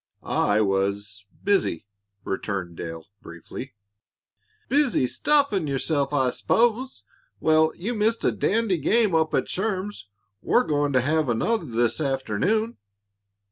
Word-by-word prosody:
"I 105 +1 +1
was 100 +1 -1 0.2
busy," 195 - +1 0.4
returned 95 -3 -4
Dale, 80 -1 -7 0.2
briefly. 105 +9 -9 0.9
"Busy 275 - +2
stuffing 205 - +1
yourself, 140 +1 0
I 130 -3 +2
s'pose. 240 - 0 0.4
Well, 155 0 +3
you 210 +8 -3
missed 225 +1 0
a - - +4
dandy 215 -4 0
game 215 - +2
up 160 -1 +2
at - - 0
Sherm's. 195 - -3 0.3
We're 245 - +3
going 145 -4 0
to 130 - +4
have 155 +1 +1
another 175 - 0
this 120 +2 0
afternoon." 140 - 0
155 Hz, 120 wpm, -24 LUFS, -, 0.9 s, a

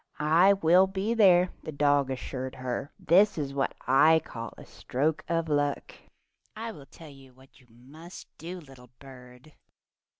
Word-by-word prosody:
"I 165 +6 +4
will 185 0 +4
be 195 +4 -2
there," 185 -5 +4
the - - -7
dog 145 -2 +1
assured 130 0 -6
her. 130 +3 -5
"This 195 +5 +3
is 140 -3 -4
what 140 -1 -2
I 155 +5 +5
call 115 -1 -8
a - - -12
stroke 150 +5 -3
of 165 -1 -1
luck. 145 -2 -2 0.6
I 225 +1 -6
'll 145 -9 -14
tell 160 +2 -14
you 135 -2 -18
what 135 +1 -22
you 125 - -24
must 145 +9 -14
do, 175 +3 -7
little 135 -6 -16
bird. 125 +2 -15
145 Hz, 160 wpm, -27 LUFS, 130-175 Hz, 0.6 s, I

